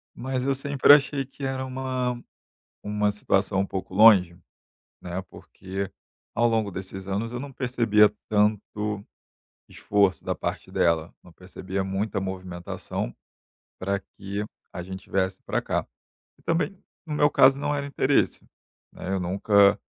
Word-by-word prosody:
mas 130 0 -2
eu 135 +1 +1
sempre 140 +1 +4
achei 140 -1 +3
que 135 +1 -12
era 130 0 -2
uma 130 -1 -2 0.7
uma 105 0 +1
situação 95 -1 +1
um 100 - 0
pouco 95 -1 -5
longe, 95 -4 +7 0.7
né. 90 +1 -4
Porque, 95 +1 -6 0.4
ao 120 +1 +3
longo 110 -3 +1
desses 95 +1 -7
anos, 105 +4 -2
eu 120 - -4
não 140 +1 -7
percebia 115 -5 +3 0.2
tanto 105 0 0 0.7
esforço 100 -2 +1
da - - -1
parte - - -4
dela, 85 -1 +1
não 90 - -16
percebia 95 +2 -5
muita 95 +2 -2
movimentação 90 -8 -5 0.6
pra 100 +1 -1
que 100 +1 -6 0.3
a 90 - -5
gente 95 +2 -9
viesse 95 -1 0
pra - - -1
cá. - - -1 0.5
E - - -25
também, 170 +4 0 0.3
no 155 - -3
meu 145 0 +4
caso, 135 +2 +5
não 145 0 0
era 140 -1 -2
interesse, 140 0 +1 0.5
né. 95 - -5
Eu 95 - -1
nunca 100 +3 +4
105 Hz, 145 wpm, -26 LUFS, 95-130 Hz, 0.7 s, longe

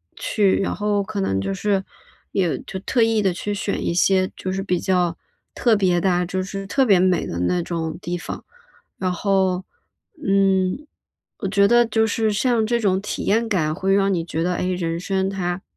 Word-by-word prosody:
去。 200 -3 +1
然 - - -1
后 210 -1 0
可 210 +1 -5
能 95 - 0
就 95 0 -2
是 195 - 0 0.5
也 180 -5 0
就 190 - -7
特 240 +4 0
意 225 -2 +3
地 190 - +2
去 205 +3 -3
选 200 0 -2
一 - - 0
些 185 +2 +2
就 185 - -4
是 190 +1 -2
比 180 -3 -1
较 180 -3 +1 0.4
特 235 -3 +3
别 185 -4 +2
的 190 +1 +2
啊， 180 0 +1
就 185 +2 -2
是 195 +1 -6
特 265 +6 +2
别 195 -5 +5
美 185 -2 +2
的 85 - -4
那 175 - 0
种 165 -2 -3
地 175 0 -4
方。 - - -7 0.5
然 185 -1 -1
后， 190 -1 +1 0.6
嗯， 195 +6 +2 0.5
我 200 - -4
觉 200 0 +4
得 240 +1 +5
就 220 0 +2
是 220 0 0
像 225 +1 +1
这 235 +1 +1
种 190 -3 +1
体 205 - -4
验 225 +3 +1
感 160 -7 +1
会 195 +2 +1
让 195 0 +2
你 165 -2 -1
觉 165 -1 -3
得， 180 +1 0
诶， 180 +1 -1
人 165 -2 -2
生 190 +1 -1
它， 180 -1 -3
190 Hz, 215 characters per minute, -22 LUFS, 180-205 Hz, 0.6 s, 别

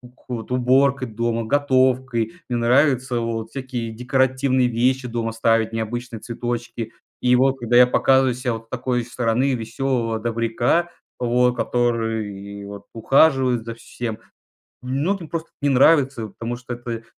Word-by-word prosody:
ку 125 -3 -6
уборкой 130 +1 +2
дома, 115 +1 -1
готовкой. 130 -3 +1 0.2
Мне 120 - 0
нравится 125 0 +2
вот 115 -1 -3
всякие 125 -4 -5
декоративные 130 +2 +1
вещи 125 +2 +1
дома 115 -1 -2
ставить, 115 0 +1
необычные 115 +1 -4
цветочки. 120 -1 -4 0.3
И 125 0 +4
вот 135 +1 +2
когда 120 0 0
я 125 - +9
показываю 130 0 +3
ся 125 -1 -2
вот 115 0 -7
с - - -44
такой 125 -1 -1
стороны 125 +2 0
веселого 115 0 -2
добряка, 115 +9 0 0.3
вот 125 0 +2
который 110 -5 -2
вот 100 0 -9
ухаживает 130 0 +3
за 115 - -5
всем, 115 -1 -6 0.6
многим 155 +7 -2
просто 165 -1 -4
эт - - -49
не 145 - +2
нравится, 135 -4 +4
потому 115 +4 -5
что 120 0 -7
п 120 -1 -5
э, - - -22
120 Hz, 145 wpm, -22 LUFS, 115-130 Hz, 0.6 s, я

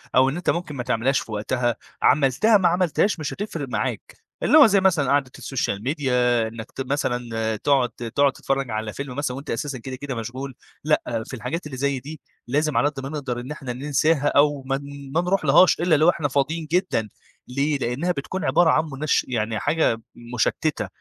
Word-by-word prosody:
أو 130 +1 +5
إن 140 - -3
أنت 180 - -2
ممكن 170 -4 -1
ما 125 - -3
تعملهاش 125 +5 +1
في 115 - -9
وقتها، 120 +3 -1 0.3
عملتها 150 - +4
ما 185 - +3
عملتهاش 180 +1 +1
مش 150 - -3
هتفرق 170 -9 -5
معاك، - - -3 0.3
اللي 310 - +6
هو 290 - +10
زي 200 -1 +4
مثلًا 165 -8 +2
قعدة 140 -3 +1
السوشيال 110 -6 -3
ميديا 125 -5 +1
إنك 110 0 -9
ت - - -6
مثلًا 120 -5 -1
تقعد 130 +1 +2 0.3
تقعد 140 -1 +4
تتفرّج 135 -1 -2
على 110 0 -3
فيلم 140 -2 -6
مثلًا 135 -2 -2
وأنت 140 - -9
أساسًا 135 +3 -3
كده، 130 +2 -7
كده 135 0 -5
مشغول، 125 +3 -6 0.3
لأ، 120 -7 0
في - - -10
الحاجات 160 +9 -4
اللي 140 -3 -7
زي 140 0 0
دي 150 +3 -10 0.3
لازم 145 0 0
على 125 +5 +3
قد 140 -2 -9
ما 135 - -4
نقدر 135 -5 -4
إن 125 +4 -7
إحنا 135 -5 -5
ننساها 145 +2 +1
أو 145 -1 +3
ما 135 0 0
ن 140 -1 -10
ما 170 - +4
نروحلهاش 180 -2 +4
إلّا 170 -2 +3
لو 155 +4 +5
إحنا 155 -4 +1
فاضيين 150 +4 -1
جدًا، 175 - +1 0.4
ليه؟ 140 +3 0
لأنها 135 +8 -1
بتكون 175 +5 -4
عبارة 160 +5 +4
عن 155 - +3
منش 145 +2 +1
يعني 110 -3 -1
حاجة 145 -7 +1 0.3
مُشتِّتة 120 - 0
140 Hz, 195 wpm, -23 LUFS, 125-155 Hz, 0.4 s, هو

